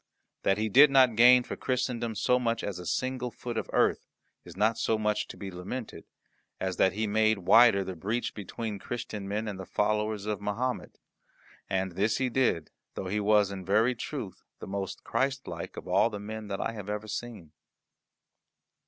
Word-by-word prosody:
That 95 - +2
he 110 +1 0
did 135 +8 +7
not 130 -4 +5
gain 125 +2 +7
for - - -6
Christendom 120 -3 -2
so 125 +4 +2
much 115 -2 -1
as 100 -3 -4
a 90 - -7
single 130 -1 -1
foot 120 0 -7
of 110 - -3
earth - - +2 0.4
is - - -13
not 110 +2 +2
so 110 - +1
much 105 -1 0
to - - -10
be 100 -2 -6
lamented, 100 +7 -7 0.5
as 95 -1 -2
that 95 - +3
he 110 +2 -1
made 110 +1 +2
wider 100 +2 +6
the 95 -1 -6
breach 105 +8 -2
between 105 +1 -5
Christian 110 -3 -5
men 105 +2 -2
and 100 -2 -5
the 95 - -6
followers 105 0 0
of 105 -2 -3
Mahomet. 115 +5 -3 0.7
And 95 0 -1
this 105 +5 0
he 130 -1 0
did, 115 - +1 0.2
though 95 - -4
he 105 +2 0
was 105 -1 +3
in 95 -1 -6
very 110 +7 +3
truth 120 - -6 0.2
the - - -8
most 95 -1 -5
Christlike 135 +3 -3
of - - -8
all - - +3
the 105 -2 -6
men 110 +1 -7
that 100 -1 -4
I - - -1
have 105 -3 -8
ever 105 +1 -4
seen. 105 -8 -6
110 Hz, 190 wpm, -29 LUFS, 100-120 Hz, 0.7 s, did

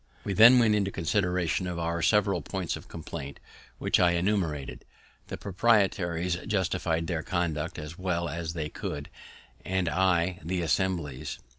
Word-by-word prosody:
We 100 - -2
then 115 +6 +8
went 115 -3 +4
into 100 -2 +1
consideration 90 -1 0
of 90 -1 -4
our 85 0 -2
several 100 +3 +2
points 95 -4 -3
of - - -11
complaint, 70 0 -7 0.4
which - - +1
I 90 -1 +4
enumerated. 85 -6 -1 0.4
The - - -6
proprietaries 90 -4 +1
justify'd 90 -5 0
their 85 -2 -2
conduct 80 -3 -2
as 75 +4 -8
well 90 -2 -1
as 80 +1 -4
they 80 -3 -3
could, 75 -1 -6 0.5
and 95 -1 -1
I 90 +1 +1
the 90 +1 -2
Assembly's. 85 -6 -1
90 Hz, 145 wpm, -28 LUFS, 80-95 Hz, 0.5 s, then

